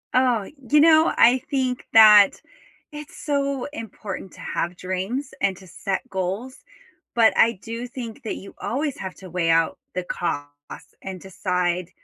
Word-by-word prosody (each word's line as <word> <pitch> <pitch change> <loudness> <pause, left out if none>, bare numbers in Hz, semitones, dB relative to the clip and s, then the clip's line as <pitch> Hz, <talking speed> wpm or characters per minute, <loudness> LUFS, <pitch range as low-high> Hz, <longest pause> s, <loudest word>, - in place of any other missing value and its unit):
Oh, 245 -5 +2 0.2
you 300 - +5
know, 315 +1 +6
I 245 +3 +6
think 260 -3 -1
that 210 -2 +9 0.6
it's 300 0 -10
so 280 -2 -1
important 205 - -7
to - - -15
have 175 +1 -3
dreams 190 +10 -3
and 195 -2 +1
to 190 - -14
set 195 +6 -4
goals, 195 +8 -3 0.6
but 225 -2 +5
I 230 +1 +5
do 230 +2 -5
think 240 -3 -8
that 220 - -3
you 195 - -10
always 280 +3 -2
have 190 -1 -6
to 185 -1 -12
weigh 170 -1 0
out 165 0 +2 0.2
the 185 - -1
costs 145 -5 -3 0.5
and 190 -1 -7
decide 180 -1 -2
215 Hz, 155 wpm, -23 LUFS, 185-255 Hz, 0.6 s, that